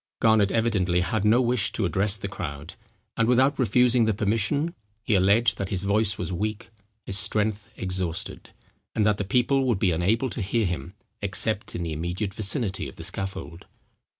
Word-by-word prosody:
Garnet 110 -3 +4
evidently 100 -6 +1
had 95 +3 -1
no 115 +4 +4
wish 120 -2 +1
to 110 - 0
address 95 +4 +1
the 100 - -5
crowd; 75 -6 -6 0.4
and 115 - +1
without 130 +4 +3
refusing 125 -1 +4
the 110 -2 +1
permission, 115 +10 0 0.3
he 110 - 0
alleged 100 +5 +3
that 95 - -2
his 95 -1 -2
voice 100 0 +2
was 90 0 -4
weak, 105 +5 -4 0.3
his 95 0 -1
strength 105 +1 -1
exhausted, 90 -3 -3 0.5
and 110 - +2
that 105 -1 +2
the - - 0
people 125 +7 +2
would 120 -5 +1
be 95 -1 +2
unable 110 +10 +1
to - - -4
hear 110 +3 0
him, 90 0 -4 0.3
except 105 +1 0
in 85 - -3
the 80 -2 -3
immediate 90 +6 -3
vicinity 105 -1 -1
of - - -14
the 80 - -9
scaffold. 95 -1 -6
105 Hz, 175 wpm, -25 LUFS, 95-115 Hz, 0.5 s, Garnet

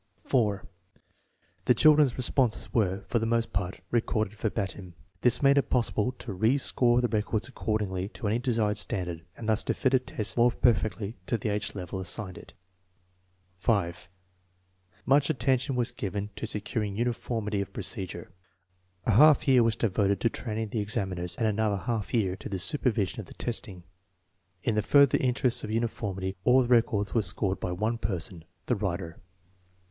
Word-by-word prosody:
4. 105 -7 +1 1.0
The 125 - +4
children's 150 0 +5
responses 120 -4 0
were, 100 -4 +1
for 115 - +1
the 115 - -1
most 115 0 0
part, 95 -2 -3
recorded 110 -3 0
verbatim. 95 -4 -4 0.3
This 125 +3 +3
made 140 +1 +6
it - - -2
possible 120 -1 +1
to 120 -4 -7
re 110 +8 +2
score 125 -3 +3
the 120 - +2
records 110 0 -1
according 105 -6 -2
to 110 - -5
any 110 +3 +1
desired 110 -4 0
standard, 90 -5 -2
and 115 - -7
thus 110 0 +2
to - - 0
fit 130 -2 +1
a 130 - +6
test 125 -4 -4
more 120 +1 +5
perfectly 110 -2 0
to 120 - +1
the 110 -1 -3
age 105 0 -2
level 95 0 -5
assigned 95 0 -5
it. - - -15 1.0
5. 95 -5 0 1.0
Much 140 +2 +4
attention 135 -2 +1
was 120 -1 +1
given 100 0 -4
to 115 - -4
securing 105 -1 -3
uniformity 115 -3 -2
of 100 - -6
procedure. 95 -6 -5 0.7
A - - +2
half 145 +9 +6
year 130 -2 +6
was 115 -1 +2
devoted 100 -3 +1
to 115 - +3
training 110 -2 -4
the 110 0 -2
ex 105 +1 -3
aminers, 90 -5 -2
and 115 - 0
another 105 -1 +1
half 105 +2 -3
year 100 -6 +1
to - - -8
the 95 - -2
supervision 105 - 0
of - - -7
the - - -13
testing. 100 -6 -4 0.8
In 115 - +1
the 105 - +2
further 140 +4 +5
interests 125 -1 +1
of - - -5
uniformity 100 -4 -2
all 130 +4 +5
the - - -3
rec 120 -1 +4
ords 105 -2 -1
were 115 - +3
scored 95 -2 -1
by 90 - -3
one 110 +6 -1
perspn. 95 -4 -2 0.2
(the 125 - +1
writer). 90 -4 -4
110 Hz, 175 wpm, -28 LUFS, 100-120 Hz, 1.0 s, made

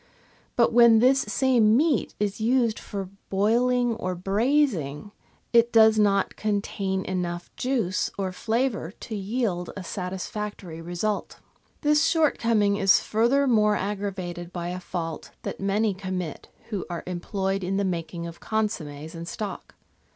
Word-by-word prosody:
But 235 -2 +3
when 235 -1 +7
this 260 +4 +5
same 230 -1 +3
meat 295 -3 +1
is 205 +1 -1
used 235 -1 +2
for 195 -2 -6 0.2
boiling 240 +4 +2
or 185 -4 -3
braising, 200 - 0 0.4
it 235 0 +5
does 220 -1 +6
not 200 -2 +2
contain 200 -2 -2
enough 175 -2 -4
juice 235 -8 0
or 190 -2 -2
flavour 225 -1 -1
to 220 - -5
yield 200 -3 -2
a 190 - -5
satisfactory 185 -1 -5
result. 175 +5 -3 0.4
This 300 0 +4
shortcoming 230 -11 +2
is 195 -2 +5
furthermore 230 -2 +3
aggravated 190 -4 -4
by 175 -1 -4
a 180 +1 -4
fault 165 -3 -5
that - - -5
many 200 +2 +1
commit 185 -4 -5 0.2
who 205 -5 -2
are 170 -1 -4
employed 190 +2 -2
in 190 +2 -1
the 200 - +1
making 170 -1 -3
of 170 0 -8
consommes 160 -9 -3
and 165 0 -7
stock. 210 +2 -6
200 Hz, 135 wpm, -26 LUFS, 180-230 Hz, 0.4 s, when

